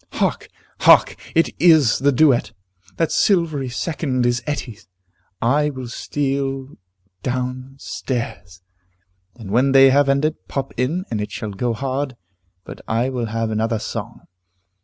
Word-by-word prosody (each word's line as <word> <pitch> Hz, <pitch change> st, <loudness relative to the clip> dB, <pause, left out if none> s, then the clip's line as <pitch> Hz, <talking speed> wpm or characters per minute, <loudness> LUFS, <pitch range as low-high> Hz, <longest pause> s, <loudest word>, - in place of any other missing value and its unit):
Hark! -, -, -1 dB, 0.3 s
hark! -, -, +6 dB, 0.2 s
It 165 Hz, -, +3 dB
is 160 Hz, -9 st, +5 dB
the 140 Hz, +2 st, +3 dB
duet! 130 Hz, -5 st, +3 dB, 0.4 s
That 165 Hz, -, +1 dB
silvery 160 Hz, -9 st, +1 dB
second 130 Hz, -1 st, -2 dB
is 120 Hz, 0 st, +1 dB
Etty's. 130 Hz, -7 st, -5 dB, 0.6 s
I 145 Hz, +5 st, +2 dB
will 130 Hz, -4 st, -7 dB
steal 135 Hz, 0 st, -2 dB, 0.5 s
down 130 Hz, +2 st, -3 dB
stairs, 95 Hz, -10 st, -5 dB, 0.7 s
and 110 Hz, -5 st, -9 dB
when 130 Hz, +5 st, +3 dB
they 135 Hz, 0 st, +7 dB
have 140 Hz, +1 st, +3 dB
ended, 150 Hz, +3 st, 0 dB
pop 135 Hz, -1 st, -4 dB
in, 155 Hz, +10 st, -1 dB
and 110 Hz, -2 st, -1 dB
it 105 Hz, -, -4 dB
shall 110 Hz, -, -5 dB
go 115 Hz, +5 st, -1 dB
hard 135 Hz, +2 st, -3 dB, 0.5 s
but -, -, -10 dB
I 115 Hz, +3 st, 0 dB
will 125 Hz, -3 st, -3 dB
have 115 Hz, 0 st, -2 dB
another 110 Hz, +1 st, 0 dB
song. -, -, -6 dB
130 Hz, 135 wpm, -21 LUFS, 115-140 Hz, 0.7 s, they